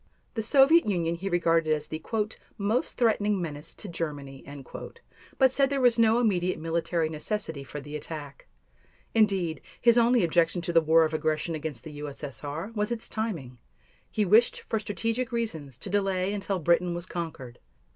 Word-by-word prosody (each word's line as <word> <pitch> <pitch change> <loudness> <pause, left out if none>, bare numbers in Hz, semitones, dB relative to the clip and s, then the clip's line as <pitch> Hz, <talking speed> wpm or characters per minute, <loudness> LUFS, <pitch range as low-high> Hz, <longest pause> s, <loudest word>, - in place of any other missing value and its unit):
The 225 - -1
Soviet 275 +6 +5
Union 170 -4 0
he 185 +4 -4
regarded 165 -2 +2
as 150 0 -5
the 155 +1 -6 0.6
"most 215 +5 0
threatening 210 -4 +2
menace 155 -2 -5
to - - -9
Germany," 145 -6 -5 0.9
but 265 -2 +5
said 275 0 +3
there 280 -1 0
was 245 -2 +4
no 225 0 +5
immediate 185 -6 +1
military 165 0 0
necessity 160 -1 -3
for 140 +3 -7
the 145 +1 -8
attack. 150 -2 -7 0.7
Indeed, 195 -7 +2 0.2
his 235 0 +5
only 235 -2 +4
objection 170 +1 +2
to 170 - -2
the 165 - +6
war 160 +1 +5
of 155 - -3
aggression 155 +1 -1
against 155 -6 -5
the 155 - -8
U.S.S.R. 145 - -6
was 210 0 -1
its 230 -1 -3
timing; 165 - -4 0.5
he 215 - 0
wished 220 +6 +4
for 220 - -2
strategic 225 +4 -2
reasons 160 - -3
to - - -9
delay 195 -1 +1
until 195 -1 -2
Britain 170 +1 +2
was 175 0 -4
conquered. 160 -9 -6
175 Hz, 165 wpm, -28 LUFS, 155-215 Hz, 0.9 s, the